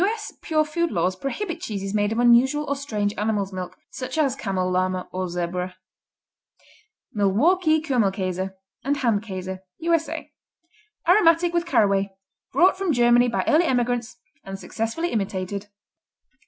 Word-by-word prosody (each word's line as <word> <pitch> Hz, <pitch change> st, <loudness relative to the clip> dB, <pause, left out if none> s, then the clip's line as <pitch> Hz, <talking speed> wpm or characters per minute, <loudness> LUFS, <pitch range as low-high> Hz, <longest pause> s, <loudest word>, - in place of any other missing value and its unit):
S. 430 Hz, +2 st, -2 dB
pure 310 Hz, -1 st, +1 dB
food 340 Hz, +3 st, -1 dB
laws 185 Hz, +1 st, 0 dB
prohibit 335 Hz, -, -4 dB
cheeses 195 Hz, -2 st, -4 dB
made 205 Hz, 0 st, +1 dB
of 225 Hz, -, -2 dB
unusual 245 Hz, +5 st, +4 dB
or 280 Hz, -, 0 dB
strange 215 Hz, -8 st, -2 dB
animal's 205 Hz, -2 st, -1 dB
milk, 185 Hz, -1 st, -6 dB
such 260 Hz, +4 st, -5 dB
as 280 Hz, -5 st, +2 dB
camel, 190 Hz, -6 st, -1 dB
llama 185 Hz, 0 st, 0 dB
and 185 Hz, 0 st, -2 dB
zebra. 180 Hz, +1 st, -3 dB, 1.4 s
Milwaukee 310 Hz, -, +3 dB
Kümmelkäse 195 Hz, -, 0 dB, 0.3 s
and 280 Hz, +2 st, 0 dB
Hand 230 Hz, -7 st, +1 dB
Käse 190 Hz, -3 st, -6 dB, 0.2 s
U.S.A. 330 Hz, -1 st, -1 dB, 0.8 s
Aromatic 345 Hz, -2 st, +5 dB
with 345 Hz, 0 st, 0 dB
caraway, 200 Hz, -, +2 dB, 0.4 s
brought 375 Hz, +2 st, +4 dB
from 385 Hz, -3 st, +1 dB
Germany 240 Hz, -1 st, +4 dB
by 235 Hz, -, 0 dB
early 325 Hz, +3 st, +4 dB
emigrants 245 Hz, -3 st, 0 dB, 0.3 s
and 195 Hz, 0 st, -6 dB
successfully 225 Hz, -, -3 dB
imitated. 195 Hz, -1 st, -3 dB
235 Hz, 135 wpm, -24 LUFS, 195-310 Hz, 1.4 s, Aromatic